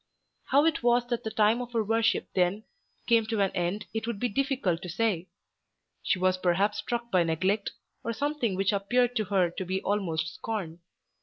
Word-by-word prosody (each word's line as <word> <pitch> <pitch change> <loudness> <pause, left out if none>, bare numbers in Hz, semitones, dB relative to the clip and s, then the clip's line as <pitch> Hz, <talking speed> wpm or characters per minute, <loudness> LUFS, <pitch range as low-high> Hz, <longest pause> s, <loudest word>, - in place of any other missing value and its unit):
How 285 +3 +4
it 325 - +1
was 240 0 +3
that 240 -2 -1
the 220 - -2
time 220 +2 +3
of 245 0 -7
her 225 -2 +1
worship 225 +1 +1
then 185 +3 +1 0.4
came 230 -2 +3
to 220 -2 -1
an 195 -1 +2
end 180 +4 -2
it 225 0 -3
would 235 -4 -3
be 245 - 0
difficult 255 - 0
to 180 - -7
say. 185 -2 0 0.7
She - - +1
was 185 0 +1
perhaps 195 +4 +1
struck 235 +2 -3
by 185 - +4
neglect, 185 +5 0 0.3
or 230 - -2
something 250 -4 -1
which 195 +2 +1
appeared 240 +5 +1
to 215 - 0
her 185 -3 +2
to 190 - -4
be 185 +1 -2
almost 165 -5 -1
scorn. 185 -7 -5
210 Hz, 190 wpm, -28 LUFS, 185-235 Hz, 0.7 s, How